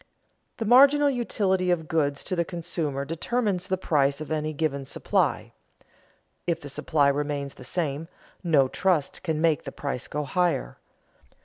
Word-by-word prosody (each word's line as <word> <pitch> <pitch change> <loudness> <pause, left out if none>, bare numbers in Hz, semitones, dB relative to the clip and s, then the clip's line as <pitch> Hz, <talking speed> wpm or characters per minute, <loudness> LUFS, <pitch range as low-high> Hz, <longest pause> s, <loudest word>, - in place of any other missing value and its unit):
The 225 - -3
marginal 280 +5 +6
utility 190 -7 0
of 165 -3 0
goods 145 -3 0
to 185 - -3
the 170 - +1
consumer 165 -5 -3
determines 185 - -1
the 190 -1 0
price 140 -5 +1
of 155 0 -7
any 155 0 -1
given 145 -2 -1
supply. 135 - -1 0.9
If 170 -1 0
the 145 - -8
supply 145 +1 +1
remains 140 -1 -1
the - - -13
same, 150 +2 -2 0.4
no 150 -6 +4
trust 175 0 0
can 160 -4 -1
make 160 -2 +2
the - - -6
price 140 -4 -4
go 150 +1 -3
higher. 145 - -1
160 Hz, 150 wpm, -26 LUFS, 145-180 Hz, 0.9 s, marginal